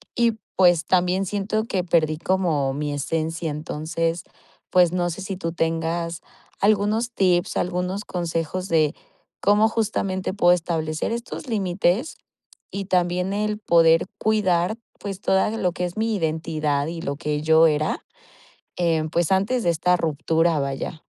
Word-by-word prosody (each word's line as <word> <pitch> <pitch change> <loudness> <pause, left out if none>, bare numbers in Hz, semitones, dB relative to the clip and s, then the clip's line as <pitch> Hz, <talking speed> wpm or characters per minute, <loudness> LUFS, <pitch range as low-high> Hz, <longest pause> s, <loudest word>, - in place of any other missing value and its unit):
y, 235 -1 +3 0.2
pues, 175 -3 +4
también 185 +1 +2
siento 205 +3 -1
que 190 -5 -1
perdí 160 -3 +1
como 165 -6 0
mi 145 0 -2
esencia. 160 +3 -2
Entonces, 160 +2 -3 0.5
pues, 180 -2 +4
no 175 -1 0
sé 175 +4 -6
si 195 0 -4
tú 165 -2 -3
tengas 165 0 -2 0.4
algunos 215 +3 +2
tips, 180 -5 +1
algunos 180 +3 -2
consejos 170 +1 -3
de 155 -2 +3 0.5
cómo 205 +2 +4
justamente 200 -4 -1
puedo 175 -3 +5
establecer 160 -1 -2
estos 235 +4 -5
límites 200 - 0 0.5
y 200 0 -4
también 180 0 0
el 210 +1 -1
poder 165 -4 +4
cuidar, 205 -2 +1 0.2
pues, 195 -2 -5
toda 190 -1 +2
lo 210 -5 -1
que 180 - -4
es 175 +2 -6
mi 220 0 0
identidad 155 -4 -1
y 165 0 -5
lo 140 -3 -3
que 150 0 -2
yo 160 +1 +5
era, 155 0 -1 0.7
eh, 165 -3 +1
pues, 170 0 +1
antes 215 +6 +1
de - - +2
esta 180 +2 +2
ruptura, 165 0 +1
vaya. 140 +3 -4
175 Hz, 145 wpm, -23 LUFS, 160-195 Hz, 0.7 s, puedo